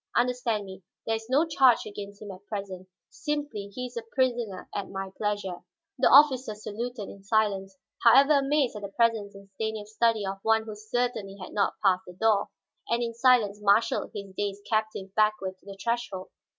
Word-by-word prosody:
Understand 240 -4 +1
me; 190 0 -10 0.2
there 225 - +1
is 225 +1 -12
no 285 +5 +4
charge 265 -7 +4
against 205 0 -8
him 205 - -7
at 190 +1 -12
present; 195 -3 -6 0.2
simply 295 -9 -3
he 250 +5 -6
is 245 0 -9
a 235 - -2
prisoner 235 -4 -1
at 200 -1 -4
my 195 0 -5
pleasure." 205 -4 -2 0.4
The 260 - +5
officer 260 -6 +6
saluted 215 +1 -5
in 195 - -12
silence, 195 -2 0 0.3
however 275 +5 +7
amazed 275 -3 +1
at 210 - -6
the 200 - -4
presence 220 -2 +1
in 200 0 -13
Stanief's 220 0 -4
study 225 -2 +2
of 195 0 -4
one 220 +1 +3
who 220 -1 -7
certainly 215 -2 -2
had 185 - -9
not 205 -2 +1
passed 185 -2 +3
the 180 - -9
door, 210 +1 +2 0.4
and 235 +1 +1
in 230 -1 -3
silence 230 -4 +3
marshaled 210 +2 +2
his 200 -2 -7
dazed 200 0 -3
captive 215 -3 -1
backward 210 -3 +1
to - - -24
the 195 0 -9
threshold. 230 -4 -3
215 Hz, 185 wpm, -27 LUFS, 200-240 Hz, 0.4 s, however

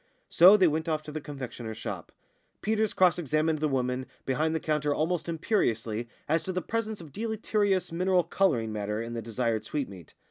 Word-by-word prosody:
So 185 +5 +8
they 185 -3 +5
went 160 +1 -1
off 155 -1 -1
to 150 - -8
the 155 0 -4
confectioner's 125 -6 -7
shop. - - -6 0.5
Peters 220 -1 +1
cross 180 -2 +3
examined 155 0 +1
the 155 - +1
woman 130 -1 -1 0.2
behind 155 +4 0
the - - +1
counter 150 -2 0
almost 170 +2 -1
imperiously 120 - 0 0.2
as 160 +2 +2
to 190 - -4
the 185 - -1
presence 220 -1 -2
of 155 -5 -12
deleterious 210 -3 0
mineral 180 +1 +2
colouring 140 - +1
matter 105 0 -2
in 115 +1 -4
the 115 - -3
desired 115 0 -1
sweetmeat. 105 - -5
155 Hz, 180 wpm, -28 LUFS, 120-180 Hz, 0.5 s, So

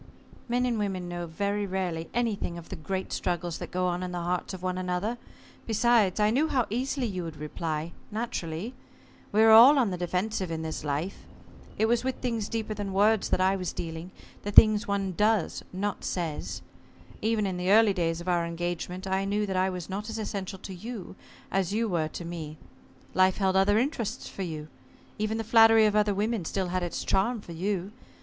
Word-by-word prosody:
"Men 245 +1 +2
and 235 -3 0
women 190 -3 -2
know 175 0 -4
very 200 +5 -1
rarely 180 -4 -2
anything 220 -7 -1
of 170 - -10
the - - -5
great 190 +4 -4
struggles 175 -1 -2
that - - -6
go 180 0 -1
on 180 0 0
in 180 -1 -4
the 175 -1 -3
hearts 180 +1 -1
of 185 -2 -8
one 185 0 -1
another. 185 +6 -2 0.5
Besides, 225 -3 +3
I 210 0 +4
knew 285 +7 +2
how 255 -6 +1
easily 260 +3 -1
you 185 -5 -3
would 165 -2 -7
reply 155 +1 -3 0.2
naturally. 210 -2 -4 0.6
We 215 +2 +4
are 225 - +7
all 245 +7 +9
on 240 -7 +3
the 180 - -4
defensive 185 +2 -1
in 160 -1 -3
this 160 -2 -4
life. 150 +6 -3 0.5
It 220 - +3
was 235 +1 +2
with 260 0 -1
things 230 -4 -2
deeper 225 -2 -2
than 200 -2 -4
words 210 +2 +3
that - - +1
I 190 +1 +3
was 185 -2 -3
dealing 165 +1 -5 0.3
the 205 - -4
things 215 +1 +7
one 200 -1 0
does 210 -1 +1
not 200 +2 -3
says. 150 - -3 0.6
Even 220 -1 +1
in 185 -2 -2
the 180 +1 -1
early 215 -1 +6
days 165 -2 -1
of 175 - -10
our 175 -1 +2
engagement 175 +2 -4
I 190 0 0
knew 205 +1 0
that 190 -2 -3
I 185 +1 +2
was 180 -2 -5
not 205 +3 -4
as 225 - -4
essential 200 -3 -4
to 190 0 -8
you 200 0 -7 0.4
as 195 0 0
you 225 +2 +1
were 170 -6 0
to 170 +2 -7
me. 160 -3 -6 0.6
Life 185 0 +4
held 190 -2 +1
other 195 +2 +4
interests 245 -3 -1
for - - -7
you. 155 -4 -4 0.5
Even 215 +1 0
the 225 - -2
flattery 225 0 +6
of 210 -1 +2
other 210 -1 +3
women 215 0 0
still 185 +2 -2
had 185 +1 -1
its 175 -1 -3
charm 220 +5 +1
for 190 - -11
you. 190 +3 -2
190 Hz, 205 wpm, -28 LUFS, 175-215 Hz, 0.6 s, all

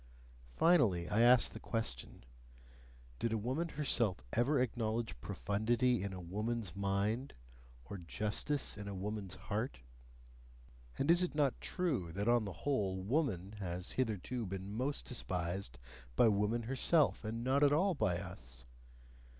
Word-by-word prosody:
Finally, 95 - +3
I 110 - +2
ask 120 0 +6
the - - -7
question: 70 - -2 1.0
Did 115 - 0
a - - +1
woman 130 +10 -1
herself 115 - +1
ever 135 +4 +3
acknowledge 115 - -1
profundity 115 +3 +1
in 100 0 -3
a 95 - -6
woman's 105 +2 -3
mind, 100 +6 -1 0.5
or 100 +10 -7
justice 105 - -1
in 105 0 -7
a 100 - -4
woman's 100 0 -4
heart? - - -3 1.2
And 140 +5 +3
is 175 +1 +6
it 180 -4 -1
not 145 -4 +1
true 135 - -1
that 100 +4 -2
on 120 -2 +4
the 100 - -4
whole 100 -9 0
"woman" 105 - 0
has 90 -1 -3
hitherto 115 -1 -2
been 95 +2 -5
most 130 +6 -2
despised 90 - -3 0.4
by 115 - +6
woman 105 +3 +1
herself, 135 +6 +2
and 115 +2 -3
not 135 +3 +2
at 145 - +6
all 185 +6 +3
by 90 - +1
us? 65 -10 -8
110 Hz, 140 wpm, -35 LUFS, 95-130 Hz, 1.2 s, ask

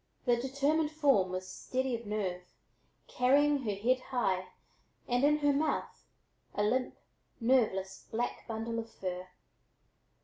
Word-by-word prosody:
The 245 -2 +4
determined 280 +5 +1
form 280 -12 +3
was 185 0 -4
steady 260 +5 -2
of 230 -2 -8
nerve, 195 -4 -2 0.7
carrying 280 +3 +3
her 210 -2 0
head 245 +6 +2
high, 195 -8 -1 0.6
and 245 +2 +1
in 300 +1 +5
her 290 -1 +3
mouth 300 +2 -1 0.5
a 205 - +1
limp, 250 +4 0 0.4
nerveless 225 -6 +1
black 240 +2 -3
bundle 230 0 -3
of 230 0 -6
fur. 185 -3 -5
240 Hz, 130 wpm, -32 LUFS, 205-270 Hz, 0.7 s, in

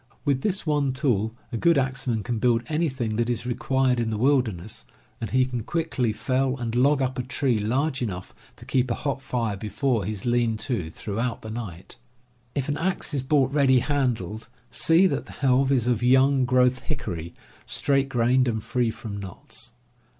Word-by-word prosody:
With 140 -3 +1
this 195 +1 -1
one 145 -4 +1
tool 115 -5 0 0.2
a 115 - -2
good 170 +6 +4
axeman 130 -4 -1
can 115 +2 -2
build 120 0 +2
any 155 +4 0
thing 120 -5 -3
that 120 0 +1
is 120 -1 -1
required 125 +1 +1
in 115 -1 0
the 110 - -2
wilderness, 110 - 0 0.3
and 115 - -3
he 130 0 +3
can 125 -2 -3
quickly 145 -4 -1
fell 130 +4 0
and 120 -2 -3
log 135 +3 +3
up 130 0 -2
a - - +2
tree 125 -1 0
large 130 +6 0
enough 95 -6 -4 0.2
to - - -13
keep 130 -1 +1
a 120 - 0
hot 140 -2 -3
fire 120 -5 -2
before 110 +3 -1
his 105 0 -4
lean 120 -2 +2
to 110 - -2
throughout 115 +7 -3
the 110 - -6
night. 100 -7 -7 0.6
If 140 -2 -1
an 145 0 -1
axe 180 -2 -1
is 140 - 0
bought 135 0 +2
ready 135 -3 +4
handled, 120 - -1 0.2
see 165 +10 +4
that 185 - 0
the - - -11
helve 135 0 +2
is 125 -4 +2
of 120 -3 +1
young 130 +2 +4
growth 125 0 +3
hickory, 85 0 -5 0.3
straight 135 -1 +1
grained, 125 +1 +3
and 110 -3 -1
free 125 -2 0
from 110 -2 -6
knots. 110 +4 -7
125 Hz, 185 wpm, -25 LUFS, 110-135 Hz, 0.6 s, good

